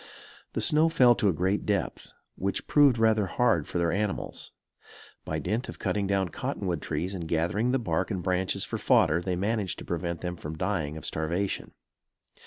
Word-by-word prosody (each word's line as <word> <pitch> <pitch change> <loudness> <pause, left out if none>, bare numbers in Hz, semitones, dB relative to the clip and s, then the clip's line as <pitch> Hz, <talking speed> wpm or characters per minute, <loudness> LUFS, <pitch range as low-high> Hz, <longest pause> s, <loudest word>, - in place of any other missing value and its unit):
The - - -1
snow 155 +2 +4
fell 125 -6 +6
to 105 -3 +1
a - - +4
great 95 +5 0
depth, 100 -4 -2 0.3
which 100 +1 -2
proved 145 -5 +5
rather 110 -3 +3
hard 110 -5 +1
for - - -3
their 85 -1 +1
animals. 100 +2 -3 0.7
By 80 - -2
dint 105 - -2
of - - -7
cutting 100 -1 -1
down 95 -2 +1
cottonwood 85 0 -3
trees 80 +5 -2
and 85 -4 -5
gathering 85 +9 0
the 130 - +2
bark 120 - -1
and 95 -5 -3
branches 95 +1 0
for - - -4
fodder, 80 +3 +3
they 90 0 -1
managed 100 0 -1
to - - -8
prevent 85 0 -3
them 90 0 -3
from 80 -1 -6
dying 80 -5 -2
of 80 - -9
starvation. 85 +5 -2
95 Hz, 185 wpm, -28 LUFS, 85-105 Hz, 0.7 s, fell